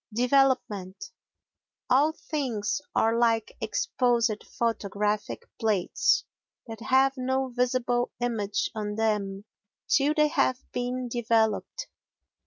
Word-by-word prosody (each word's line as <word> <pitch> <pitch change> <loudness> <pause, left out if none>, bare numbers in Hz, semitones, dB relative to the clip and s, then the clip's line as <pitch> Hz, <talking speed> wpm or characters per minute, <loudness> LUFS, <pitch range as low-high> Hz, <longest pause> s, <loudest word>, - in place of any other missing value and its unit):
Development 230 -7 +1 0.8
All 280 +5 +4
things 255 -8 -3
are 225 +1 +3
like 225 -2 +1
exposed 240 - 0
photographic 210 -2 -2 0.2
plates 210 -5 +1 0.4
that 225 -3 -8
have 265 +2 +3
no 260 +1 -1
visible 245 0 0
image 215 -4 -1
on 210 -1 -4
them 205 -2 -1 0.4
till 290 +2 +3
they 300 -1 +4
have 260 -4 +1
been 250 +1 -3
developed. 230 - 0
235 Hz, 95 wpm, -27 LUFS, 210-255 Hz, 0.8 s, All